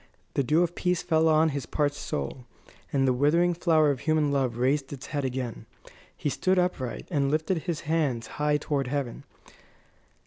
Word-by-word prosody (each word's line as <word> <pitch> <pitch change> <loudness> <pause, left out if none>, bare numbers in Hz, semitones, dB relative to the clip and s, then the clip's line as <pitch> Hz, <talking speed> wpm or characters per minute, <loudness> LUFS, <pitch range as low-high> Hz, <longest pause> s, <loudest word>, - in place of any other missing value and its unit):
The - - +2
dew 155 +6 +3
of 175 0 -2
peace 180 0 0
fell 160 -1 +3
on 160 +1 +4
his 140 -4 -4
parched 145 -1 0
soul, 120 - -5 0.4
and 135 -1 +2
the 130 - +4
withering 165 +7 +3
flower 160 -3 +3
of 135 - -3
human 155 -1 +1
love 130 -4 0
raised 135 +3 +1
its 135 -2 -7
head 145 -2 -3
again. 130 -2 -4 0.5
He - - -3
stood 185 +6 +1
upright, 180 -9 -1
and 140 -4 +1
lifted 160 +4 0
his 170 -1 -3
hands 145 -8 0
high 150 +4 0
toward 145 -2 -2
heaven. 135 -3 -3
145 Hz, 175 wpm, -27 LUFS, 135-160 Hz, 0.5 s, on